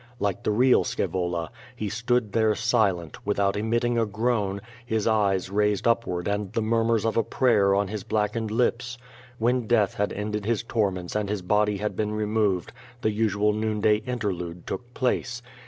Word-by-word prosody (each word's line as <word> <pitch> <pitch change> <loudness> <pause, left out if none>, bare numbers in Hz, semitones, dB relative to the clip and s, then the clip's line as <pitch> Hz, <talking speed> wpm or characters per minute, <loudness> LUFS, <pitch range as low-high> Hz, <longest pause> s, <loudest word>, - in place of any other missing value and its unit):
' 120 - -28
Like 100 - -3
the - - -1
real 125 +4 +4
Scaevola, 85 -3 -2 0.3
he 110 - -3
stood 115 +1 0
there 110 -1 +3
silent, 100 -8 0
without 100 -1 +1
emitting 115 +3 0
a 115 - +2
groan, 105 -2 0 0.2
his 110 -3 -1
eyes 100 -4 +1
raised 105 0 +1
up 115 0 +2
ward 90 -1 -3
and 100 -1 -2
the 115 - 0
murmurs 115 0 +1
of 115 - 0
a 115 - +4
prayer 105 -6 +3
on 100 0 +1
his 105 0 -5
blackened 110 +1 -1
lii)s. 120 +2 0 0.4
When 120 0 +1
death 105 -4 +3
had 105 0 -1
ended 105 0 -3
his 115 +1 0
torments 95 -7 -1
and 105 -2 -1
his 100 -3 -2
body 105 +2 +2
had 105 +2 -3
been 105 0 -1
removed, 105 -4 0 0.3
the 110 - +1
usual 105 -1 +1
noonday 110 0 +2
interlude 95 -7 -4
took 120 0 -6
place. 125 -2 -1
105 Hz, 175 wpm, -26 LUFS, 100-115 Hz, 0.4 s, real